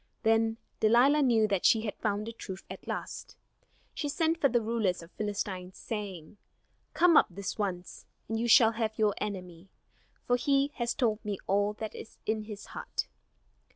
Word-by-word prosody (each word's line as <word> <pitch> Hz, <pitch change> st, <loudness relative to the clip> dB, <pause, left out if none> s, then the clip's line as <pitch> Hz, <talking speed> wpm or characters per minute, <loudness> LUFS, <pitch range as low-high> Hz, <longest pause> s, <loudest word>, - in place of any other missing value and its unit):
Then 225 Hz, 0 st, +3 dB, 0.2 s
Delilah 245 Hz, +7 st, +5 dB
knew 230 Hz, -5 st, +4 dB
that 195 Hz, -3 st, 0 dB
she 220 Hz, -, +5 dB
had 215 Hz, -2 st, -3 dB
found 210 Hz, 0 st, -1 dB
the 230 Hz, -, -6 dB
truth 190 Hz, -4 st, -8 dB
at -, -, -9 dB
last. -, -, -5 dB, 0.6 s
She 295 Hz, -, -3 dB
sent 325 Hz, +2 st, 0 dB
for 275 Hz, -, +5 dB
the 240 Hz, 0 st, +3 dB
rulers 215 Hz, -6 st, -1 dB
of 165 Hz, -, -14 dB
the -, -, -39 dB
Philistines, 195 Hz, -3 st, -3 dB
saying: 205 Hz, -5 st, -6 dB, 0.6 s
"Come 345 Hz, -1 st, +5 dB
up -, -, +7 dB
this 200 Hz, +4 st, -6 dB
once, 185 Hz, -3 st, -4 dB, 0.2 s
and 225 Hz, 0 st, -2 dB
you 235 Hz, -, 0 dB
shall 225 Hz, -1 st, +7 dB
have 220 Hz, -1 st, -2 dB
your 215 Hz, -2 st, +3 dB
enemy; 185 Hz, -3 st, -6 dB, 0.6 s
for 245 Hz, -, +3 dB
he 275 Hz, +2 st, +2 dB
has 235 Hz, -1 st, -1 dB
told 230 Hz, -5 st, 0 dB
me 205 Hz, -2 st, -3 dB
all 205 Hz, +2 st, +1 dB
that 215 Hz, 0 st, -6 dB
is -, -, -10 dB
in 215 Hz, 0 st, -1 dB
his 210 Hz, -2 st, -8 dB
heart." -, -, -3 dB
215 Hz, 180 wpm, -30 LUFS, 200-235 Hz, 0.6 s, up